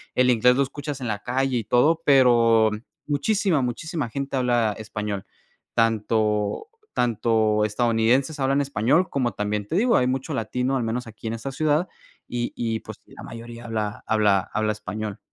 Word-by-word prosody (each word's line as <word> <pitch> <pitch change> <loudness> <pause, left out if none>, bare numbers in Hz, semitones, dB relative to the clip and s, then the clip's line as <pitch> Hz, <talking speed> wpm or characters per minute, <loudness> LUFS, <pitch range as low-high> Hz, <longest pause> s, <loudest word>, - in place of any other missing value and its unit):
el 125 0 +4
inglés 125 +1 +4
lo 140 - +3
escuchas 145 +1 -6
en 125 - -3
la 105 -1 -2
calle 130 +1 0
y 115 - -2
todo, 150 +9 +3
pero 115 -5 +5 0.4
muchísima, 165 +2 +1
muchísima 135 +3 -3
gente 140 +2 -3
habla 120 -4 +1
español. 105 -2 -5 0.5
Tanto 110 - 0 0.2
tanto 110 -3 +2
estadounidenses 120 +6 +1
hablan 135 +1 +2
español 140 +6 +1
como 125 -4 0
también 105 0 -2
te - - -3
digo, 235 +6 +3
hay 125 - +2
mucho 130 +4 -2
latino, 125 +2 -1
al 125 - -1
menos 115 +2 -3
aquí 110 0 -9
en 110 - -2
esta 115 +4 -5
ciudad, 155 +5 +1 0.4
y 120 -1 -3
y, 115 -2 -2
pues, - - -10
la - - -14
mayoría 115 +1 -9
habla 110 -2 -3
habla 105 -4 +2
habla 110 0 +1
español. 105 0 -6
120 Hz, 165 wpm, -24 LUFS, 110-135 Hz, 0.5 s, pero